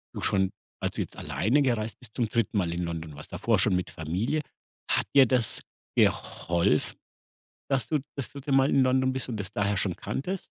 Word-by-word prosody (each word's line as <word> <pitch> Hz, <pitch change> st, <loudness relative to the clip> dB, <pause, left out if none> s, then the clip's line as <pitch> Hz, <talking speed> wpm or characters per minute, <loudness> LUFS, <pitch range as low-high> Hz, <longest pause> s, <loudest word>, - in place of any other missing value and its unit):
du -, -, -4 dB
schon, 95 Hz, -1 st, +2 dB, 0.3 s
also -, -, -2 dB
jetzt -, -, -5 dB
alleine 125 Hz, +9 st, +1 dB
gereist 115 Hz, -4 st, 0 dB
bist, 115 Hz, -4 st, -12 dB
zum 120 Hz, -3 st, +1 dB
3. 115 Hz, -2 st, 0 dB
Mal 85 Hz, -3 st, +1 dB
in 85 Hz, -, -2 dB
London 80 Hz, -3 st, -5 dB
warst, 75 Hz, -, -9 dB
davor -, -, +1 dB
schon -, -, +5 dB
mit 90 Hz, -, -1 dB
Familie. 95 Hz, -, -1 dB, 0.5 s
Hat -, -, +2 dB
dir 135 Hz, -, +9 dB
das 120 Hz, -3 st, +1 dB, 0.3 s
geholfen, 85 Hz, -2 st, +2 dB, 0.7 s
dass 135 Hz, -2 st, +2 dB
du 155 Hz, -, +2 dB, 0.2 s
das 140 Hz, -, -3 dB
3. 140 Hz, 0 st, -7 dB
Mal 135 Hz, +1 st, +5 dB
in 135 Hz, -, +4 dB
London 130 Hz, 0 st, +3 dB
bist 130 Hz, 0 st, -3 dB
und 110 Hz, -3 st, -3 dB
das 100 Hz, 0 st, -4 dB
daher 105 Hz, 0 st, 0 dB
schon 95 Hz, -3 st, +1 dB
kanntest? 185 Hz, +7 st, -4 dB
110 Hz, 195 wpm, -28 LUFS, 90-130 Hz, 0.7 s, dir